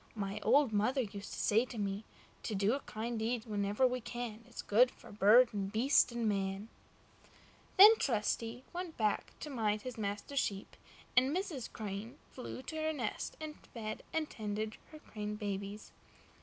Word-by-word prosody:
My 200 Hz, -1 st, -3 dB
old 265 Hz, 0 st, +4 dB
mother 250 Hz, +6 st, +2 dB
used 200 Hz, -3 st, -6 dB
to -, -, -6 dB
say 220 Hz, +3 st, +4 dB
to 245 Hz, -, -9 dB
me: 200 Hz, +1 st, -2 dB, 0.4 s
"To 215 Hz, -, -3 dB
do 200 Hz, +3 st, +2 dB
a 275 Hz, -, 0 dB
kind 230 Hz, -2 st, -4 dB
deed 225 Hz, +1 st, -1 dB
wherever 205 Hz, +2 st, +1 dB
we 250 Hz, 0 st, +1 dB
can, 235 Hz, -1 st, -5 dB
Is -, -, -7 dB
good 240 Hz, +5 st, +5 dB
for -, -, -15 dB
bird 215 Hz, +5 st, +6 dB
and 195 Hz, -1 st, -2 dB
beast 250 Hz, +4 st, +4 dB
and 235 Hz, -1 st, -1 dB
man." 195 Hz, +1 st, -1 dB, 1.1 s
Then 420 Hz, +4 st, +11 dB
Trusty 230 Hz, 0 st, -1 dB
went 350 Hz, -2 st, -5 dB
back 215 Hz, -2 st, 0 dB
to 300 Hz, -, -5 dB
mind 215 Hz, -4 st, 0 dB
his 250 Hz, -3 st, -6 dB
master's 210 Hz, +7 st, -2 dB
sheep, 200 Hz, -5 st, -2 dB, 0.4 s
and 255 Hz, +2 st, +5 dB
Mrs. 325 Hz, -, -4 dB
Crane 215 Hz, +4 st, -6 dB
flew 255 Hz, 0 st, -7 dB
to 315 Hz, +5 st, -6 dB
her 315 Hz, 0 st, 0 dB
nest 240 Hz, -8 st, -3 dB
and 310 Hz, -1 st, -7 dB, 0.2 s
fed 215 Hz, -2 st, -4 dB
and 320 Hz, -1 st, 0 dB
tended 215 Hz, -1 st, -4 dB
her 310 Hz, -, -10 dB
crane 210 Hz, -7 st, -5 dB
babies. 205 Hz, 0 st, -5 dB
225 Hz, 170 wpm, -34 LUFS, 205-255 Hz, 1.1 s, Then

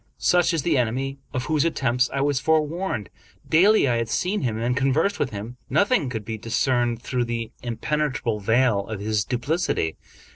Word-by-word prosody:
Such 180 Hz, 0 st, +3 dB
is 165 Hz, -5 st, -1 dB
the 155 Hz, -4 st, +2 dB
enemy 135 Hz, +4 st, -2 dB
of 125 Hz, 0 st, -3 dB
whose 155 Hz, -1 st, +1 dB
attempts 125 Hz, -6 st, +1 dB
I 135 Hz, -, -1 dB
was 140 Hz, -1 st, +1 dB
forewarned. 160 Hz, -, 0 dB, 0.4 s
Daily 190 Hz, +1 st, +5 dB
I 120 Hz, -2 st, +2 dB
had 115 Hz, -1 st, -2 dB
seen 195 Hz, -, 0 dB
him 115 Hz, -4 st, -1 dB
and 120 Hz, +2 st, 0 dB
conversed 140 Hz, +9 st, +1 dB
with -, -, 0 dB
him. 110 Hz, +4 st, -7 dB
Nothing 200 Hz, -, +2 dB
could 110 Hz, -4 st, -5 dB
be 110 Hz, 0 st, -5 dB
discerned 120 Hz, +1 st, 0 dB
through 125 Hz, -2 st, -1 dB
the 115 Hz, -1 st, -4 dB
impenetrable 125 Hz, -1 st, -1 dB
veil 110 Hz, -1 st, +2 dB
of 110 Hz, -2 st, -5 dB
his 105 Hz, 0 st, 0 dB
duplicity. 125 Hz, -, -1 dB
125 Hz, 175 wpm, -24 LUFS, 115-150 Hz, 0.4 s, Daily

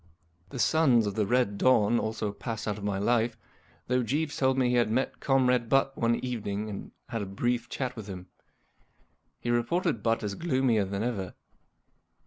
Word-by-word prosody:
The -, -, -7 dB
Sons 125 Hz, -4 st, +4 dB
of 100 Hz, -, -2 dB
the 105 Hz, -1 st, 0 dB
Red 120 Hz, -4 st, +1 dB
Dawn 120 Hz, -2 st, +4 dB
also 110 Hz, -1 st, -2 dB
passed 110 Hz, +1 st, -5 dB
out 105 Hz, 0 st, -2 dB
of -, -, -9 dB
my 100 Hz, -1 st, -1 dB
life, 115 Hz, +2 st, +1 dB, 0.5 s
though 125 Hz, 0 st, +1 dB
Jeeves 145 Hz, +6 st, -1 dB
told 130 Hz, -1 st, +2 dB
me 125 Hz, -2 st, +3 dB
he 125 Hz, -, +2 dB
had 120 Hz, -2 st, +3 dB
met 130 Hz, +4 st, -1 dB
Comrade 125 Hz, -3 st, +2 dB
Butt 135 Hz, +1 st, +2 dB
one 115 Hz, -1 st, +2 dB
evening 105 Hz, -3 st, -3 dB
and 100 Hz, -, -7 dB, 0.2 s
had 115 Hz, -3 st, -3 dB
a 100 Hz, -, -4 dB
brief 120 Hz, +5 st, -1 dB
chat 130 Hz, -2 st, -3 dB
with 110 Hz, -3 st, -8 dB
him. 90 Hz, -2 st, -7 dB, 1.1 s
He 120 Hz, -, -2 dB
reported 120 Hz, -, 0 dB
Butt 115 Hz, +1 st, +1 dB
as 105 Hz, -1 st, -2 dB
gloomier 130 Hz, -, +1 dB
than 100 Hz, +2 st, -3 dB
ever. 100 Hz, -7 st, -3 dB
115 Hz, 180 wpm, -28 LUFS, 105-125 Hz, 1.1 s, Sons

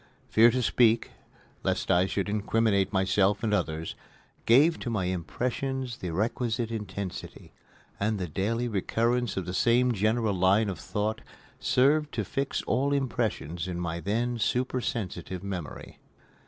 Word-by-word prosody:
Fear 115 Hz, +2 st, +6 dB
to 125 Hz, +1 st, 0 dB
speak, 115 Hz, -1 st, +3 dB, 0.5 s
lest -, -, 0 dB
I 90 Hz, +2 st, +4 dB
should 100 Hz, +1 st, -2 dB
incriminate 105 Hz, -1 st, +1 dB
myself 95 Hz, +2 st, +2 dB
and 110 Hz, -2 st, +1 dB
others, 80 Hz, -5 st, -1 dB, 0.5 s
gave 145 Hz, +8 st, +5 dB
to -, -, -4 dB
my 105 Hz, -5 st, -1 dB
impressions 125 Hz, +8 st, -2 dB
the 90 Hz, -, -4 dB
requisite 115 Hz, +5 st, -1 dB
intensity, 100 Hz, -4 st, -6 dB, 0.5 s
and 105 Hz, +1 st, 0 dB
the 90 Hz, -2 st, -3 dB
daily 110 Hz, +9 st, -1 dB
recurrence 115 Hz, +2 st, 0 dB
of 95 Hz, -, -2 dB
the 90 Hz, -, -4 dB
same 125 Hz, +5 st, +3 dB
general 110 Hz, 0 st, +1 dB
line 95 Hz, +4 st, +3 dB
of 90 Hz, -5 st, -5 dB
thought 105 Hz, +4 st, -2 dB, 0.4 s
served 150 Hz, +3 st, +3 dB
to 110 Hz, -, -1 dB
fix 135 Hz, +7 st, -2 dB
all 140 Hz, +2 st, +1 dB
impressions 105 Hz, -, -1 dB
in 90 Hz, -1 st, -4 dB
my 85 Hz, -1 st, -3 dB
then 115 Hz, +7 st, -1 dB
supersensitive 115 Hz, -5 st, -2 dB
memory. 90 Hz, -7 st, -6 dB
110 Hz, 140 wpm, -28 LUFS, 95-120 Hz, 0.5 s, Fear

